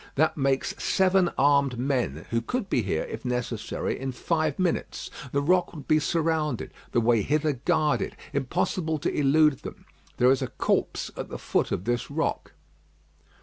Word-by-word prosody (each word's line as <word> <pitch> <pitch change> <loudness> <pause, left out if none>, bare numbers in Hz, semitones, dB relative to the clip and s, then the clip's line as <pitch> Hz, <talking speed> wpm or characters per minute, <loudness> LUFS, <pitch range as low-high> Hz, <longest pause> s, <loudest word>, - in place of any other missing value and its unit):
That 160 +3 +2
makes 135 -2 0
seven 190 -1 +3
armed 140 -2 +3
men 125 - -1
who 115 0 +1
could 250 - -3
be 125 - +3
here, 90 -6 -1
if - - -7
necessary, 125 -3 -2
in 135 0 -3
five 155 +2 -1
minutes. 185 -2 -2 0.2
The 140 0 +1
rock 180 +2 +2
would 145 -4 -9
be 155 - +4
surrounded; 155 -3 -1 0.2
the 120 - +3
way 115 -1 +3
hither 150 +5 +1
guarded. 150 +3 0 0.2
Impossible 155 +4 -1
to 145 - -2
elude 150 0 +4
them. - - -9 0.3
There 125 +1 +5
is 135 - +2
a - - -1
corpse - - -1
at - - -6
the - - -5
foot - - 0
of 85 - -1
this 120 +1 -1
rock." 160 +3 -2
140 Hz, 165 wpm, -26 LUFS, 125-160 Hz, 0.3 s, There